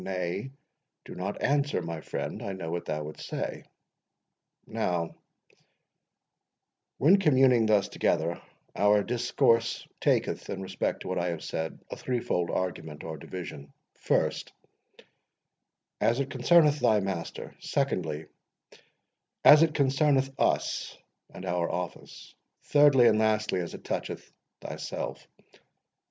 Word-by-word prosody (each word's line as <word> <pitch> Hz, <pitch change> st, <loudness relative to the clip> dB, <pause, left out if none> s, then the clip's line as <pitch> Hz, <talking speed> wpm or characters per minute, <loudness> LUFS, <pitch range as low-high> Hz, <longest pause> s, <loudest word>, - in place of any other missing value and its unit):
—Nay, 90 Hz, +5 st, -3 dB, 0.6 s
do -, -, -9 dB
not -, -, -5 dB
answer, 145 Hz, -3 st, +1 dB
my 85 Hz, -2 st, -5 dB
friend—I 100 Hz, -, -4 dB
know 85 Hz, -4 st, -5 dB
what 85 Hz, 0 st, -3 dB
thou 75 Hz, -1 st, -3 dB
wouldst 75 Hz, +1 st, -8 dB
say. -, -, -4 dB, 1.0 s
Now, 85 Hz, -2 st, -2 dB, 1.8 s
when 180 Hz, +9 st, +5 dB
communing 130 Hz, -, +4 dB
thus 105 Hz, -2 st, +3 dB
together, 85 Hz, -3 st, 0 dB, 0.3 s
our 105 Hz, 0 st, +4 dB
discourse 115 Hz, -1 st, +1 dB
taketh, -, -, 0 dB
in 95 Hz, -, -4 dB
respect 95 Hz, -, -2 dB
to -, -, -7 dB
what 95 Hz, 0 st, -1 dB
I 85 Hz, -, -1 dB
have 85 Hz, -2 st, -4 dB
said, 80 Hz, 0 st, -4 dB
a -, -, -3 dB
threefold 115 Hz, -9 st, -1 dB
argument, 80 Hz, -5 st, -3 dB
or 80 Hz, -1 st, -5 dB
division: 70 Hz, -3 st, -8 dB, 0.3 s
First, -, -, 0 dB, 1.5 s
as 120 Hz, +3 st, +2 dB
it 140 Hz, -, -2 dB
concerneth 150 Hz, +3 st, +4 dB
thy 110 Hz, -5 st, +4 dB
master; 95 Hz, -4 st, -5 dB
secondly, 80 Hz, -, -1 dB, 1.2 s
as 150 Hz, +1 st, +10 dB
it 160 Hz, -2 st, +3 dB
concerneth 135 Hz, -1 st, +2 dB
us -, -, 0 dB, 0.3 s
and 95 Hz, -, -9 dB
our 90 Hz, -1 st, 0 dB
office; 90 Hz, -3 st, -6 dB, 0.3 s
thirdly 145 Hz, -4 st, +5 dB
and 110 Hz, -, +4 dB
lastly, 110 Hz, -3 st, +1 dB
as 85 Hz, -1 st, -4 dB
it -, -, -12 dB
toucheth -, -, -5 dB, 0.3 s
thyself. -, -, -6 dB
100 Hz, 120 wpm, -28 LUFS, 85-130 Hz, 1.8 s, as